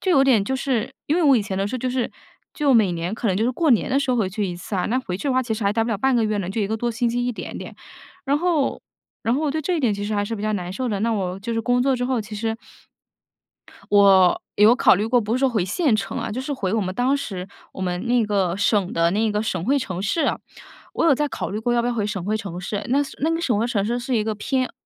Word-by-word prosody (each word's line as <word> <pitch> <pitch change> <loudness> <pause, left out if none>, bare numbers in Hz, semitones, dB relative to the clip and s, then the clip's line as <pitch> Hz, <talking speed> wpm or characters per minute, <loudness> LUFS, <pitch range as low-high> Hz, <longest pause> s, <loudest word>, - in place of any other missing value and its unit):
就 380 - 0
有 275 - +5
点 230 -7 +4
就 265 - -2
是 255 -4 -2
因 305 - +1
为 355 - +2
我 280 -4 +6
以 220 - +1
前 195 -2 -4
的 195 - 0
时 215 - -4
候 - - -2
就 255 - -2
是 250 -2 -1 0.4
就 290 -4 +2
每 205 -6 +4
年 170 +4 -3
可 225 -1 -2
能 185 - +1
就 215 - +1
是 245 - +2
过 320 +3 +1
年 235 - +3
的 270 - +3
时 275 - 0
候 250 - +2
回 210 -5 +1
去 210 +2 -2
一 175 -1 -5
次 185 +3 -7
啊， 180 - 0
那 245 +4 +1
回 220 -9 -4
去 280 +9 -3
的 - - +2
话 260 - +3
其 235 -3 -3
实 220 - -5
还 200 - +3
呆 225 +1 +1
不 235 - -2
了 215 - 0
半 265 +4 +2
个 230 - +2
月 215 0 0
呢， 185 -3 -3
就 220 - -2
1 205 - +1
个 220 +2 -2
多 240 +2 -1
星 235 +1 -1
期 245 +1 -1
一 - - +1
点 - - -7
点。 - - -8 0.5
然 280 +1 +1
后 335 -4 0 0.4
然 230 +2 +1
后 290 - -1
我 300 - +1
对 315 +2 -1
这 360 +4 0
一 - - -1
点 240 -6 +2
其 200 0 -4
实 215 +1 -2
还 205 0 0
是 225 - -4
比 205 - -6
较 215 0 0
难 180 -2 -4
受 255 +6 -3
的， 205 -3 -2
那 230 +2 +1
我 190 -3 -2
就 230 +4 -4
是 225 - 0
工 245 +2 +1
作 270 +1 +2
之 245 - -2
后， 255 -1 0
其 210 0 -8
实 225 +1 -2 1.4
我 195 -3 +6
有 215 +3 +6
考 - - +5
虑 200 +3 0
过， 245 +1 +3
不 220 +1 -2
是 - - -1
说 270 0 +3
回 215 -6 0
县 275 - +1
城 205 -2 -2
啊， - - -3
就 255 - -3
是 265 - -6
回 200 -8 -2
我 225 - +1
们 185 -2 -3
当 250 +4 +2
时， 190 -10 -4 0.3
我 - - -9
们 180 +4 -2
那 240 -1 +3
个 195 -4 0
省 200 -2 +1
的 165 0 +3
那 215 +4 +1
个 210 0 -1
省 185 -6 -2
会 280 +3 +3
城 185 -8 -4
市， 210 - 0 0.7
我 - - 0
有 325 - +5
在 295 +2 -1
考 - - -4
虑 205 - -3
过 240 +2 0
要 235 - +2
不 - - -1
要 245 - 0
回 215 -3 -1
省 195 -4 -4
会 215 +2 -1
城 195 -5 -5
市。 200 +3 -4
那 265 +3 +2 0.2
那 315 - +1
个 330 - 0
省 240 -10 +1
会 225 - +1
城 210 -5 0
市 235 +3 -1
是 245 0 -1
一 215 - +1
个 220 -1 -1
偏 255 +4 -1
225 Hz, 335 characters per minute, -22 LUFS, 200-255 Hz, 1.4 s, 我